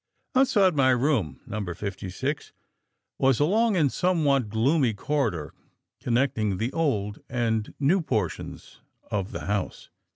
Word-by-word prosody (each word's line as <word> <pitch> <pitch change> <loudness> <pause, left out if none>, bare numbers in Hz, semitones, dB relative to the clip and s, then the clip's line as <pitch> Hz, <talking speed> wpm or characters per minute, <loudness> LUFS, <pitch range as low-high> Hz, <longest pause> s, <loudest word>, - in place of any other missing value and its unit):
"Outside 210 -8 +4
my 135 -2 +4
room 125 - +1
No. 105 0 -4
56 100 - -4 0.7
was 135 -2 +3
a 145 - +4
long 215 +3 +2
and 145 -6 +3
somewhat 150 - +2
gloomy 120 +2 +2
corridor 110 - -1 0.5
connecting 115 -5 0
the 115 +6 -2
old 105 -11 -1
and 115 -3 -1
new 165 +7 +3
portions 110 - -4 0.3
of 100 -1 -2
the - - -5
house. 100 -1 -3
125 Hz, 125 wpm, -26 LUFS, 105-150 Hz, 0.7 s, Outside